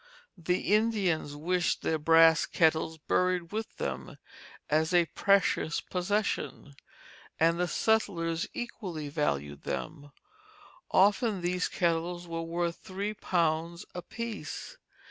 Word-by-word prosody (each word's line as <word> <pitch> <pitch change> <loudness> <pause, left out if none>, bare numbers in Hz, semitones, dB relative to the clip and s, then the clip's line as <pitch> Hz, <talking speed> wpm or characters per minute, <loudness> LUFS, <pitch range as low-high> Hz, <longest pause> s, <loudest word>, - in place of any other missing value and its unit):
The 180 +3 0
Indians 200 -9 +1
wished 175 +3 0
their 160 - 0
brass 165 +1 +6
kettles 160 -1 +2
buried 180 +2 0
with 220 +1 -5
them 65 -1 -4 0.5
as 160 +3 +2
a 175 -1 +5
precious 195 -3 +2
possession, 185 -5 -2 0.7
and 165 +1 +3
the 180 - +1
settlers 170 -5 0
equally 180 -11 -5
valued 70 - -2
them; 145 -2 -5 0.8
often 205 +1 +3
these 180 +1 0
kettles 175 0 -1
were 165 0 -3
worth 170 +1 -2
three 200 +3 -4
pounds 170 -3 -1
apiece. 230 - -6
170 Hz, 105 wpm, -29 LUFS, 160-190 Hz, 0.8 s, brass